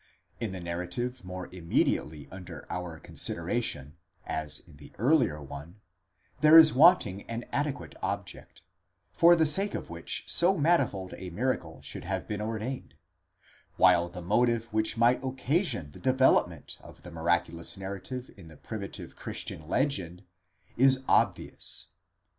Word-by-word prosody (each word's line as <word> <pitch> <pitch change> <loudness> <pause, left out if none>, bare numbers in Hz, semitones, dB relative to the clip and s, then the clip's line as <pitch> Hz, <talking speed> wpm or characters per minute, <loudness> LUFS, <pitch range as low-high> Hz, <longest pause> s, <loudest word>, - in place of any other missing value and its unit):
In 115 -4 -3
the 95 - -6
narrative 90 +9 -4
more 90 -1 -7
imme 90 -2 +1
diately 75 -2 -3
under 90 -3 -9
our 90 -3 -5
consideration, 70 +2 -3 0.3
as 75 -1 -1
in 80 -5 -16
the - - -13
earlier 125 - +2
one, 75 +8 -10 0.6
there 155 +1 +8
is 160 -2 +9
wanting 130 - +5
an 115 +1 -4
adequate 145 0 -2
object, 100 -4 -5 0.5
for 170 +1 +6
the 160 -1 +3
sake 195 +7 +3
of - - -6
which 85 0 -3
so 185 +3 +3
manifold 140 - +1
a 95 - -7
miracle 90 -4 -3
should - - -7
have 95 +1 -3
been 105 -1 -3
ordained; 110 +4 -4 0.8
while 90 -2 +5
the 90 0 -8
motive 115 +4 +2
which 110 +1 +1
might 120 +3 +3
occasion 130 - -1
the - - -13
development 130 0 +2
of - - -15
the 90 - -10
miraculous 85 +2 -1
narrative 100 +7 -6
in 95 -5 -13
the 80 -2 -14
primitive 105 -3 -7
Christian 75 - -6
legend 95 - -1 0.5
is 130 +1 +5
obvious. - - +1
100 Hz, 140 wpm, -29 LUFS, 85-130 Hz, 0.8 s, is